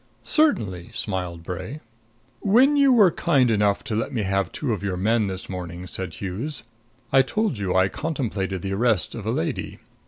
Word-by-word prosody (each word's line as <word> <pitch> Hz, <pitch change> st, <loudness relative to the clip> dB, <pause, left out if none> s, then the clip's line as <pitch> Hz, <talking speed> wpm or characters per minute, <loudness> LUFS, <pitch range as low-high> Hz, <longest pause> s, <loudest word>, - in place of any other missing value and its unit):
"Certainly," 105 Hz, -, +1 dB
smiled 90 Hz, -4 st, -3 dB
Bray. 95 Hz, -, -6 dB, 0.6 s
"When 255 Hz, -, +4 dB
you 280 Hz, -2 st, +5 dB
were 210 Hz, -8 st, +6 dB
kind 135 Hz, -8 st, +2 dB
enough 105 Hz, -2 st, +2 dB
to 120 Hz, -6 st, -3 dB
let 115 Hz, +5 st, -1 dB
me 115 Hz, -6 st, -1 dB
have 95 Hz, 0 st, 0 dB
two 135 Hz, -6 st, -2 dB
of 100 Hz, -, -3 dB
your 95 Hz, -2 st, -2 dB
men 110 Hz, +3 st, +2 dB
this 95 Hz, -1 st, -5 dB
morning," 90 Hz, -1 st, -6 dB
said 95 Hz, -1 st, -6 dB
Hughes, 110 Hz, +9 st, -5 dB, 0.5 s
"I 135 Hz, -, +7 dB
told 210 Hz, -, -1 dB
you 95 Hz, -2 st, -1 dB
I 95 Hz, 0 st, +5 dB
contemplated 100 Hz, -, -3 dB
the 95 Hz, 0 st, -2 dB
arrest 110 Hz, -3 st, +1 dB
of -, -, -6 dB
a -, -, +1 dB
lady. -, -, -3 dB
105 Hz, 180 wpm, -24 LUFS, 95-140 Hz, 0.6 s, I